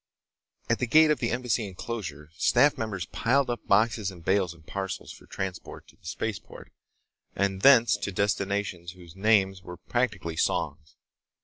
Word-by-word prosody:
At 115 Hz, -, +1 dB
the 125 Hz, -, -1 dB
gate 155 Hz, +5 st, +6 dB
of 150 Hz, -, +1 dB
the 120 Hz, -, -1 dB
Embassy 125 Hz, -3 st, -1 dB
enclosure, 90 Hz, -6 st, -6 dB
staff 135 Hz, +10 st, +4 dB
members 110 Hz, -6 st, -4 dB
piled 130 Hz, +2 st, +1 dB
up 120 Hz, -, -6 dB
boxes 110 Hz, 0 st, +2 dB
and 85 Hz, -3 st, -12 dB
bales 95 Hz, -2 st, +2 dB
and 85 Hz, -2 st, -16 dB
parcels 95 Hz, +1 st, -5 dB
for -, -, -15 dB
transport 95 Hz, -3 st, -6 dB
to -, -, -20 dB
the -, -, -15 dB
spaceport 110 Hz, +4 st, -6 dB, 0.6 s
and 95 Hz, -1 st, -1 dB
thence 120 Hz, -3 st, +6 dB
to 100 Hz, -, -4 dB
destinations 100 Hz, -3 st, -2 dB
whose 85 Hz, -3 st, -15 dB
names 95 Hz, -2 st, +2 dB
were 90 Hz, 0 st, -9 dB
practically 100 Hz, -5 st, -2 dB
songs. 75 Hz, -3 st, -1 dB
100 Hz, 155 wpm, -27 LUFS, 90-115 Hz, 0.6 s, gate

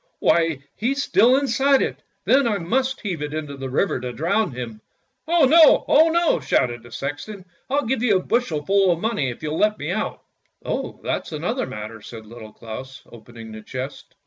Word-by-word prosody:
" -, -, -47 dB
Why, 165 Hz, -5 st, +2 dB
he's 275 Hz, +5 st, -1 dB
still 250 Hz, +3 st, +4 dB
inside 275 Hz, 0 st, +2 dB
it, -, -, -4 dB, 0.2 s
then 270 Hz, -1 st, +4 dB
I 210 Hz, -3 st, +1 dB
must 260 Hz, +9 st, -1 dB
have 175 Hz, -7 st, -3 dB
it 150 Hz, +1 st, -4 dB
into 150 Hz, -2 st, -5 dB
the 135 Hz, -1 st, -6 dB
river 140 Hz, +4 st, 0 dB
to 125 Hz, 0 st, -5 dB
drown 170 Hz, -, 0 dB
him." 115 Hz, -3 st, -7 dB, 0.5 s
"Oh 335 Hz, -3 st, +4 dB
no, 315 Hz, +3 st, +6 dB
oh 320 Hz, +3 st, +5 dB
no!" 340 Hz, 0 st, +2 dB
shouted 120 Hz, -2 st, 0 dB
the 120 Hz, -, -15 dB
sexton. 145 Hz, +8 st, -6 dB, 0.2 s
"I'll 285 Hz, +1 st, 0 dB
give 240 Hz, 0 st, -1 dB
you 220 Hz, -6 st, +3 dB
a 185 Hz, -, -4 dB
bushel 170 Hz, -12 st, -1 dB
full 195 Hz, -1 st, +3 dB
of 170 Hz, -, -1 dB
money 195 Hz, -, -1 dB
if 120 Hz, -, -9 dB
you'll 155 Hz, +1 st, -2 dB
let 210 Hz, 0 st, +2 dB
me 145 Hz, +4 st, -4 dB
out! 215 Hz, +4 st, -3 dB
" -, -, -46 dB
" -, -, -35 dB
Oh, -, -, -4 dB
that's -, -, -3 dB
another 205 Hz, -, -2 dB
matter," 105 Hz, +1 st, -7 dB
said 110 Hz, 0 st, -10 dB
Little 110 Hz, -1 st, -11 dB
Claus, 130 Hz, +5 st, -9 dB
opening 115 Hz, -1 st, -12 dB
the 110 Hz, 0 st, -9 dB
chest. 130 Hz, +5 st, -7 dB
165 Hz, 205 wpm, -22 LUFS, -, 0.5 s, no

